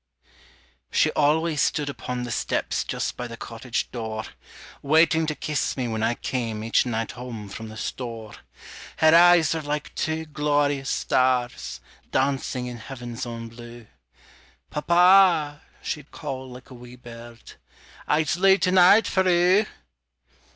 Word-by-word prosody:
She - - +2
always 155 +1 +1
stood 150 -2 0
upon 125 -3 -5
the 120 - -5
steps - - -1
Just - - -3
by 125 - -5
the 115 -1 -9
cottage 115 +1 -4
door, 110 -2 -5 0.6
Waiting 160 +2 +3
to 155 - -2
kiss 150 -2 -2
me 125 -2 -2
when 110 -1 -3
I 115 +2 +1
came 115 -5 -4
Each 115 +2 +2
night 115 -1 -2
home 115 -4 -8
from 110 +3 -8
the 110 - -10
store. 115 -2 -6 0.6
Her 160 0 +5
eyes 175 -2 +6
were 160 - -3
like 150 0 -4
two 160 0 -2
glorious 145 -2 0
stars, 125 -1 0 0.3
Dancing 130 -2 -1
in 125 -1 -6
heaven's 120 0 -7
own 115 -1 -6
blue 120 0 -12 0.9
"Papa," 170 -2 +4 0.2
she'd 150 -2 -5
call 130 -3 -7
like 125 +2 -13
a - - -9
wee 125 0 -12
bird, 120 -1 -13 0.6
"_I's 155 +2 +1
looten 190 0 +4
out 195 +5 +7
for 190 -1 +1
oo! 180 +4 +4
135 Hz, 140 wpm, -24 LUFS, 120-160 Hz, 0.9 s, out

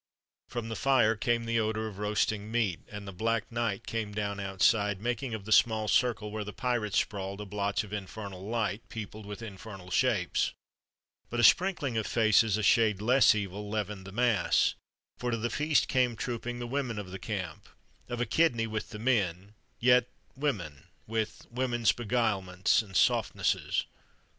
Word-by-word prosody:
From 120 -2 -5
the 110 - -3
fire 115 -1 +3
came 115 +1 0
the 115 0 +1
odor 110 0 -1
of 100 -2 -9
roasting 105 0 0
meat, 110 -7 0
and 105 -1 -8
the - - -5
black 110 +3 -1
night 115 -2 -2
came 110 -3 -3
down 100 -1 -2
outside, 100 +1 +2
making 120 +2 -2
of 100 -3 -8
the 110 - -7
small 110 -1 +4
circle 110 -3 +1
where 110 0 -3
the 105 - -6
pirates 120 -4 -1
sprawled 100 -1 -2
a 105 - -5
blotch 100 0 -1
of 105 -1 -10
infernal 100 -1 -6
light, 110 0 -1
peopled 110 -1 -7
with 105 +2 -7
infernal 95 -3 -9
shapes. 110 -6 +1 0.8
But 120 - -3
a - - +3
sprinkling 155 - +4
of 110 - -3
faces 110 -2 +3
a 110 - -2
shade 105 -1 +4
less 120 +2 +5
evil 100 0 -4
leavened 105 -2 -3
the - - -8
mass; 120 +1 +2 0.5
for 125 - -2
to 115 - 0
the 115 +1 -2
feast 150 +2 +2
came 125 -3 +2
trooping 120 +1 -4
the 120 - -4
women 125 -2 -2
of 100 -3 -6
the 95 - -6
camp: 95 -7 -5 0.4
of 120 - -3
a 120 - +1
kidney 115 -2 +2
with 110 -1 -4
the 110 - -7
men 105 -5 0 0.3
yet 125 0 +5 0.3
women, 100 - -3 0.2
with 110 -1 -3
women's 120 -3 +2
beguilements 105 -6 +1
and 95 -4 -4
softnesses. - - +1
110 Hz, 170 wpm, -30 LUFS, 100-120 Hz, 0.8 s, less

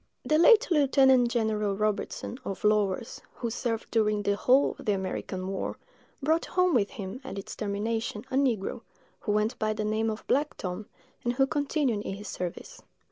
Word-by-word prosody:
The 305 0 +3
late 455 +6 +7
Lieutenant 265 -5 +5
General 215 -4 0
Robertson, 215 +3 -2
of 195 - -5
Lawers, 210 +1 +1
who 235 -2 -3
served 230 -1 -3
during 210 -2 +2
the 200 0 +2
whole 255 +6 +3
of - - -10
the 210 - +4
American 190 -1 -3
war, 195 0 -3 0.5
brought 320 +3 +2
home 365 -1 +2
with 210 -6 +3
him, 215 +1 -7
at 230 -7 -7
its 195 - -6
termination, 215 +1 -2
a - - -1
negro, 245 -8 0 0.4
who 210 - -2
went 210 +2 0
by 215 0 +1
the 215 0 -3
name 220 +1 0
of 215 0 -5
Black 295 +3 0
Tom, 185 +3 -5 0.4
and 240 - 0
who 270 +2 +3
continued 285 -5 0
in 195 - -4
his 205 +1 -9
service. 180 -2 -6
220 Hz, 180 wpm, -28 LUFS, 205-265 Hz, 0.5 s, late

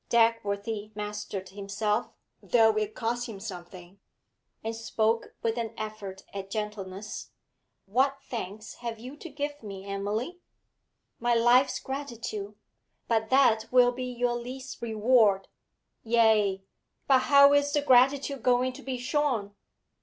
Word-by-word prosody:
Dagworthy 215 -2 +1
mastered 210 -2 -5
himself, 205 +3 -2 0.3
though 225 -2 +4
it 215 0 -1
cost 240 +1 -2
him 205 -3 -7
something, 180 -1 -9 0.6
and 225 +1 -3
spoke 225 0 -1
with 230 +1 0
an 225 -1 -4
effort 210 -3 -6
at 195 -1 -6
gentleness. 210 -1 -5 0.6
'What 265 +7 +2
thanks 215 -2 -6
have 235 -2 -5
you 250 +5 -9
to 335 - -9
give 290 0 -4
me, 195 -3 -8
Emily?' 205 - -3 0.8
'My 240 0 +2
life's 240 +3 +4
gratitude 235 -7 -5 0.5
but 220 -1 +1
that 240 -5 +4
will 250 -1 +6
be 255 +1 -5
your 245 -1 -1
least 250 +1 -7
reward.' 220 -3 +3 0.5
'Ay, 220 -4 +3 0.4
but 265 -2 +5
how 280 +1 +6
is 285 0 +3
the 290 0 +1
gratitude 275 +1 +4
going 250 +1 +2
to - - -11
be 260 -1 -4
shown?' 250 -6 -1
225 Hz, 130 wpm, -28 LUFS, 210-250 Hz, 0.8 s, will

